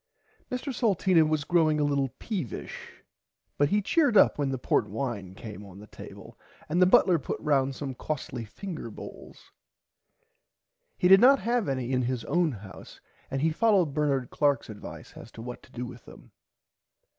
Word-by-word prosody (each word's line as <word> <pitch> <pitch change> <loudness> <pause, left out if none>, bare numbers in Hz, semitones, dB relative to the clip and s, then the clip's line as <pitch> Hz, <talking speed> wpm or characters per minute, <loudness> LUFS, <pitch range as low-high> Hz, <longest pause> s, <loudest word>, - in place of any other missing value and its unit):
Mr 255 +2 -3
Salteena 190 -7 +3
was 155 -2 0
growing 155 -2 +2
a - - +2
little 140 -2 +1
peevish 180 - -6 0.6
but 145 0 +3
he 205 +3 +1
cheered 285 - +3
up - - +5
when 140 -2 0
the 135 - -2
Port 105 -3 0
wine 105 -5 -4
came 105 -1 -9
on 100 -2 -13
the 105 - -11
table - - -12 0.3
and 175 +4 +1
the 185 - +7
butler 185 -5 +5
put - - -4
round 135 -3 +1
some 135 -1 -5
costly 130 -3 -5
finger 170 - -7
bowls. - - -12 1.5
He 180 - +3
did 195 +2 +8
not 270 +3 +7
have 235 -4 0
any 130 -2 -2
in 130 -1 +1
his 125 -1 -2
own 175 -3 +1
house 100 -5 -11 0.3
and 135 0 -2
he 160 - +3
followed 190 -5 +2
Bernard 140 -4 0
Clarks 140 -6 +1
advice 105 - -10
as - - -11
to - - -9
what 125 0 -7
to - - -20
do 125 -1 -5
with 120 0 -11
them. - - -15
145 Hz, 175 wpm, -27 LUFS, 125-180 Hz, 1.5 s, did